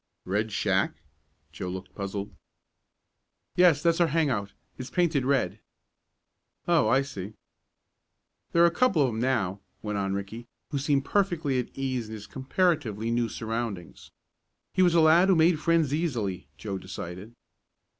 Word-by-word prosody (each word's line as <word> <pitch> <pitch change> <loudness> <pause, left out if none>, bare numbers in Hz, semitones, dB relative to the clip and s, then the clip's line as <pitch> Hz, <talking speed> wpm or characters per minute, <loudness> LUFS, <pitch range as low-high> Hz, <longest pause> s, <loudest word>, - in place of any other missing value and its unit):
"Red 105 +4 -1
Shack?" - - +1 0.6
Joe 90 +3 -5
looked 95 +1 -7
puzzled. 100 0 -5 1.2
"Yes, 175 -5 +5
that's 170 0 +3
our 170 - +5
hang 160 -2 +1
out. 100 -4 -2 0.3
It's 130 - -6
painted 165 -7 +1
red." 120 -7 +1 1.1
"Oh, 170 -9 +4
I 135 +5 +3
see." 100 -6 -7 1.2
"There 170 - +5
are - - +8
a 170 - +4
couple 180 - +3
of 130 - +2
'em 110 -1 -4
now," 115 -7 0 0.2
went 105 -1 -2
on 95 0 -1
Ricky, 110 +4 -6 0.2
who 140 - -1
seemed 140 -1 +1
perfectly 170 -10 +1
at 125 - -3
ease 130 -4 -2
in 110 - -7
his 105 -1 -9
comparatively 130 - 0
new 120 -1 +1
surroundings. 110 -6 -5 0.6
He - - +2
was 175 -2 +4
a 165 - +6
lad 165 +4 +6
who 190 - +6
made 160 0 +4
friends 165 -3 +2
easily, 120 - -2
Joe 100 -3 -4
decided. 95 +4 -8
130 Hz, 155 wpm, -27 LUFS, 105-160 Hz, 1.2 s, are